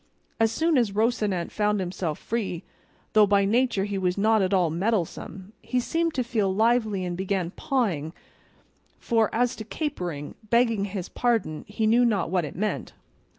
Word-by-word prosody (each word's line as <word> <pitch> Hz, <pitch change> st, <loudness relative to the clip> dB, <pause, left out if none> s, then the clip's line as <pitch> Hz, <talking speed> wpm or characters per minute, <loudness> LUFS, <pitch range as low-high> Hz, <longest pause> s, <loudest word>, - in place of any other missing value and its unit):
As 225 Hz, -1 st, +3 dB
soon 320 Hz, +1 st, +2 dB
as 220 Hz, -5 st, 0 dB
Rocinante 210 Hz, -5 st, 0 dB
found 210 Hz, -1 st, +1 dB
himself 180 Hz, -4 st, -3 dB
free, 210 Hz, -7 st, -3 dB, 0.5 s
though 215 Hz, -1 st, +6 dB
by 200 Hz, 0 st, +3 dB
nature 235 Hz, -1 st, +2 dB
he 200 Hz, -1 st, -2 dB
was 180 Hz, 0 st, 0 dB
not 220 Hz, +1 st, +3 dB
at 185 Hz, 0 st, +1 dB
all 180 Hz, -5 st, +2 dB
mettlesome, 190 Hz, +1 st, -2 dB
he 255 Hz, -, -1 dB
seemed 330 Hz, +6 st, -1 dB
to 255 Hz, -, +1 dB
feel 220 Hz, -5 st, 0 dB
lively 220 Hz, -2 st, +2 dB
and 175 Hz, -1 st, -3 dB
began 185 Hz, -1 st, -2 dB
pawing 190 Hz, -, -1 dB, 0.9 s
for 225 Hz, -2 st, +1 dB
as 245 Hz, +2 st, +1 dB
to 220 Hz, -, -5 dB
capering, 180 Hz, -, -4 dB, 0.2 s
begging 230 Hz, -3 st, +3 dB
his 190 Hz, -3 st, -5 dB
pardon, 225 Hz, -11 st, -1 dB
he 210 Hz, +1 st, -2 dB
knew 235 Hz, +3 st, +4 dB
not 205 Hz, -8 st, +1 dB
what 180 Hz, -3 st, +1 dB
it 145 Hz, -, -8 dB
meant. 210 Hz, +4 st, -3 dB
210 Hz, 165 wpm, -26 LUFS, 185-235 Hz, 0.9 s, though